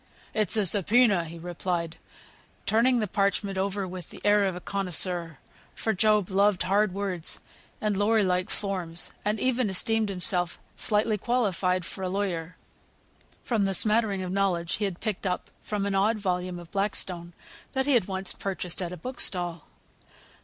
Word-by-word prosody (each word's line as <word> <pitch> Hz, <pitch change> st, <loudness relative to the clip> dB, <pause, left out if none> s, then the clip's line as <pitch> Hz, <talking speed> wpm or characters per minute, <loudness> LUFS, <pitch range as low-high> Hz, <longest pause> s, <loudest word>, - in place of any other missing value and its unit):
"It's 215 Hz, -1 st, +3 dB
a 210 Hz, -, +3 dB
sub 190 Hz, 0 st, +2 dB
poena," 210 Hz, -7 st, +5 dB
he 165 Hz, +1 st, -9 dB
replied, 170 Hz, -1 st, -3 dB, 0.7 s
turning 240 Hz, +3 st, +4 dB
the 215 Hz, -3 st, 0 dB
parchment 200 Hz, 0 st, 0 dB
over 195 Hz, 0 st, -1 dB
with 180 Hz, -2 st, -7 dB
the -, -, -10 dB
air 205 Hz, 0 st, +5 dB
of 190 Hz, -2 st, -1 dB
a -, -, -5 dB
connoisseur; 180 Hz, -4 st, -1 dB, 0.4 s
for 220 Hz, -, 0 dB
Job 210 Hz, -1 st, +3 dB
loved 200 Hz, -1 st, +3 dB
hard 200 Hz, +2 st, +2 dB
words, 185 Hz, -3 st, -2 dB, 0.4 s
and 210 Hz, -1 st, 0 dB
lawyer 210 Hz, +2 st, +3 dB
like 180 Hz, +1 st, +1 dB
forms, 180 Hz, -4 st, -1 dB
and 210 Hz, +1 st, 0 dB
even 255 Hz, -2 st, +1 dB
esteemed 220 Hz, +3 st, +2 dB
himself 180 Hz, -2 st, -1 dB, 0.2 s
slightly 210 Hz, 0 st, +1 dB
qualified 185 Hz, -6 st, +1 dB
for 190 Hz, -, -7 dB
a 185 Hz, -, -1 dB
lawyer, 180 Hz, -4 st, -2 dB, 0.9 s
from 220 Hz, -5 st, +1 dB
the 195 Hz, 0 st, +1 dB
smattering 210 Hz, -2 st, +2 dB
of 180 Hz, -, -4 dB
knowledge 185 Hz, -3 st, 0 dB
he 210 Hz, -, 0 dB
had 190 Hz, -3 st, -4 dB
picked 210 Hz, -3 st, -2 dB
up 180 Hz, -, -3 dB
from 205 Hz, -2 st, -2 dB
an 200 Hz, -, -1 dB
odd 205 Hz, +3 st, +3 dB
volume 180 Hz, -3 st, -2 dB
of 175 Hz, -1 st, -11 dB
Blackstone 185 Hz, -4 st, -1 dB, 0.4 s
that 265 Hz, 0 st, +1 dB
he 285 Hz, -, +3 dB
had 235 Hz, -7 st, +4 dB
once 190 Hz, -1 st, -2 dB
purchased 190 Hz, -2 st, -3 dB
at 175 Hz, -1 st, -3 dB
a 180 Hz, -, -6 dB
book 250 Hz, +10 st, -7 dB
stall. 175 Hz, -3 st, -1 dB
195 Hz, 170 wpm, -27 LUFS, 180-210 Hz, 0.9 s, poena